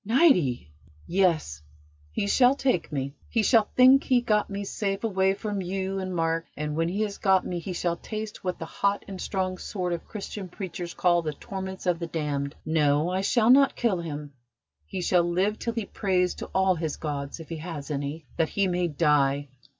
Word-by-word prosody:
"Niti!" 190 - +3 0.3
"Yes, 170 - +1 0.5
he 140 - -1
shall 250 +6 +4
take 260 - 0
me; 140 -1 -3 0.2
he 230 -3 +1
shall 220 -2 +4
think 260 +2 +7
he 255 - +2
had 245 -1 +2
got 210 -2 +2
me 200 0 -4
safe 195 0 -2
away 190 -3 +2
from 205 -1 -3
you 190 +1 -2
and 185 -1 -4
Mark 165 0 0
and 150 0 -3
when 165 +1 +1
he 200 +4 -2
has 205 -2 -4
got 190 -2 +3
me 175 -1 -3
he 185 +2 -5
shall 170 -1 -1
taste 215 +1 -6
what 180 -1 -2
the 165 - -5
hot 200 +4 -1
and 195 -2 -7
strong 185 -2 -2
sort 180 -3 -3
of 170 - -5
Christian 205 -2 -6
preachers 175 -2 -6
call 175 -1 +3
the 155 -2 -3
torments 190 +3 -6
of 175 -2 +1
the 170 - -3
damned. 145 -3 -2
No, 155 +1 +2
I 185 +1 0
shall 225 +3 +4
not 275 +1 +6
kill 220 -7 +1
him. 150 -3 -6 0.5
He 185 - -4
shall 180 0 +4
live 185 +5 0
till 230 - -2
he 230 -3 -2
prays 185 -3 0
to - - -7
all 190 0 +2
his 160 -3 -3
gods, 145 -1 -4
if 165 - -10
he 165 - -4
has 155 -3 -6
any, 145 +2 -4
that 160 - +2
he 200 -1 +1
may 180 -1 0
die. 145 -3 +2
180 Hz, 205 wpm, -27 LUFS, 160-200 Hz, 0.5 s, think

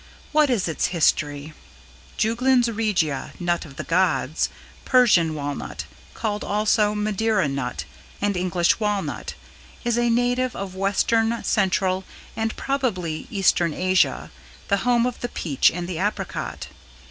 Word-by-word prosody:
What 300 -1 +4
is 230 -8 +1
its 160 - 0
history? 150 -3 0 0.6
Juglans 240 +2 +3
Regia 180 -10 0
(nut 175 -1 -1
of 140 -3 -12
the - - -5
gods) 170 -4 +1 0.3
Persian 200 - +4
Walnut, 145 -1 -5 0.3
called 210 -2 -2
also 210 0 +2
Madeira 210 -2 +1
Nut 125 - -3 0.3
and 205 -1 0
English 180 0 +1
Walnut, 210 -2 -2 0.5
is 240 -1 +1
a 240 0 +2
native 245 +2 +1
of 195 -2 -5
Western, 225 +4 +1
Central 190 -2 +1 0.3
and 225 0 -2
probably 185 - -2
Eastern 180 -5 +2
Asia, 185 0 +1 0.4
the 200 - +3
home 240 +3 +2
of 250 -1 -3
the 245 - -3
peach 145 - +2
and 175 0 -5
the 175 -3 -4
apricot. 200 -1 -3
200 Hz, 130 wpm, -23 LUFS, 175-230 Hz, 0.6 s, What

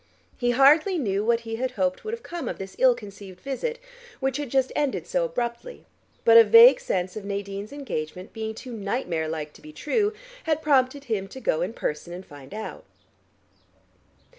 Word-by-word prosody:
He 245 - 0
hardly 300 +9 +5
knew 205 -8 0
what 235 +1 +2
he 225 -1 -5
had 255 +1 -2
hoped 185 -1 0
would 435 - -4
have 465 - -17
come 345 -1 -5
of - - -5
this 195 0 -8
ill 255 -2 +6
conceived 200 -3 -11
visit, 370 - -3 0.4
which 270 0 -1
had 290 -3 -4
just 265 0 +1
ended 290 -3 -1
so - - 0
abruptly, 245 - -4 0.4
but 230 0 +8
a - - +10
vague 230 +4 +8
sense 180 0 -2
of 215 - -6
Nadine's 200 +1 -5
engagement 185 - -5
being 220 -1 -4
too 250 +2 -8
nightmare 200 -6 -2
like 155 -1 -5
to - - -17
be 155 - -11
true 410 - 0 0.3
had 315 -1 0
prompted 275 -1 +2
him 215 -7 -2
to 260 - -10
go 160 -10 0
in 180 +6 -2
person 160 -3 -4
and 185 +2 -8
find 140 -2 -13
out. 220 +1 -7
230 Hz, 190 wpm, -25 LUFS, 195-275 Hz, 0.4 s, a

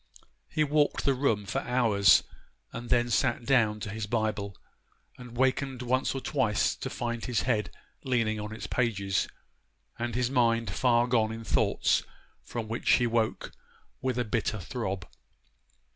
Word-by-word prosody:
He 155 - +1
walked 150 0 +1
the 140 - +4
room 120 -6 0
for 100 - -2
hours; 115 -5 +4 0.5
and 120 0 -6
then 120 0 +2
sat 120 +2 +1
down 110 -6 +3
to 105 - -4
his 110 -1 -4
Bible, 105 -3 -2 0.6
and 125 -1 -11
wakened 130 0 0
once 130 +2 0
or 135 - -3
twice 115 -9 +1
to - - -5
find 120 -1 -3
his 125 -3 0
head 115 -5 0 0.3
leaning 115 -4 0
on 105 0 -5
its 110 - -6
pages, 100 -6 0 0.7
and 120 -1 -2
his 125 0 0
mind 115 -4 +2
far 120 +2 +3
gone 115 -3 +2
in 115 0 -6
thoughts - - +2 0.4
from 115 -2 -5
which 115 +2 +1
he 120 - +4
woke 115 -1 0 0.5
with 130 -2 -1
a 125 - 0
bitter 110 0 -1
throb. 95 -2 -4
120 Hz, 155 wpm, -29 LUFS, 110-125 Hz, 0.7 s, the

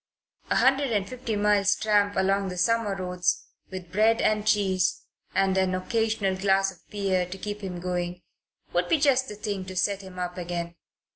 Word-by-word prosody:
A - - +2
hundred 270 0 +3
and 205 -3 0
fifty 245 -2 -4
miles' 205 -1 +3
tramp 205 -1 +2
along 195 +1 +1
the 180 - -6
summer 215 +2 +1
roads, 180 -1 -1 0.3
with 185 -2 -8
bread 220 +4 +3
and 215 0 +1
cheese 190 -4 +2 0.3
and 195 -1 +2
an 185 -1 +1
occasional 215 0 0
glass 195 0 +2
of 180 - -17
beer 195 -3 0
to 185 +2 -7
keep 210 +2 -5
him 180 -3 -5
going, 180 0 -3 0.5
would 175 0 +1
be - - +4
just 265 -3 +3
the 210 - -7
thing 205 -2 -4
to 185 0 -8
set 195 +2 0
him 190 -1 -11
up 180 0 -4
again. 170 -1 -4
195 Hz, 185 wpm, -26 LUFS, 180-210 Hz, 0.5 s, be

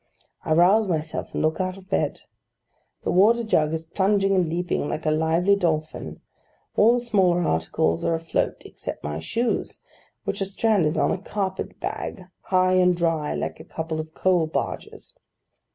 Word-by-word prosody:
I 155 - +1
rouse 195 +6 +5
myself, 160 -3 -3
and - - 0
look 155 +4 +1
out 185 0 -2
of 190 -1 -15
bed. - - -1 0.8
The - - 0
water 220 +6 +4
jug 155 -8 +2
is 160 0 -3
plunging 195 +3 +2
and 180 -4 +2
leaping 170 -3 -1
like 155 - -4
a 155 - +3
lively 165 +5 +3
dolphin; 160 -5 -2 0.5
all 230 +3 +5
the - - +1
smaller 190 -7 +2
articles 80 - 0
are 165 - +1
afloat, 165 0 -2
except - - -7
my 75 +1 -3
shoes, 230 - -2 0.4
which - - -3
are - - +2
stranded 195 -5 +1
on - - +2
a 185 - -2
carpet 195 -2 -4
bag, 185 - -4 0.2
high 185 0 +3
and 180 -1 +4
dry, 165 -3 0
like - - -4
a - - -9
couple 160 -1 -4
of 155 0 -7
coal 180 -4 +2
barges. 155 - -5
175 Hz, 170 wpm, -24 LUFS, 160-195 Hz, 0.8 s, rouse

